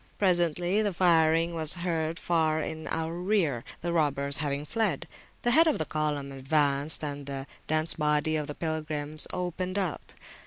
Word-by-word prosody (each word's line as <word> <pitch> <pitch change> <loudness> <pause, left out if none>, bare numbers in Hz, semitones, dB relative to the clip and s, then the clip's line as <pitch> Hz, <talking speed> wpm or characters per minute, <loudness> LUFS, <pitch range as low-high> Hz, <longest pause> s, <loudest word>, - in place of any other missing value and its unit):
Presently 175 +1 +2
the 205 -3 0
firing 165 -1 +3
was 160 -1 +1
heard 165 -2 -2
far 160 -2 +1
in 160 0 -5
our 160 0 -2
rear, 175 - 0 0.2
the 170 0 -2
robbers 140 -3 +1
having 145 -1 -2
fled. 210 -5 -1 0.4
The 240 - +3
head 325 +6 +7
of 310 - +2
the 155 - -1
column 150 -3 -2
advanced, 140 +2 +2
and 145 -1 -5
the 135 -1 -5 0.2
dense 155 +1 +1
body 150 +1 +1
of 150 -1 -2
pilgrims 155 -2 -2
opened 180 +1 -3
out. 185 -5 -3
160 Hz, 155 wpm, -28 LUFS, 150-175 Hz, 0.4 s, head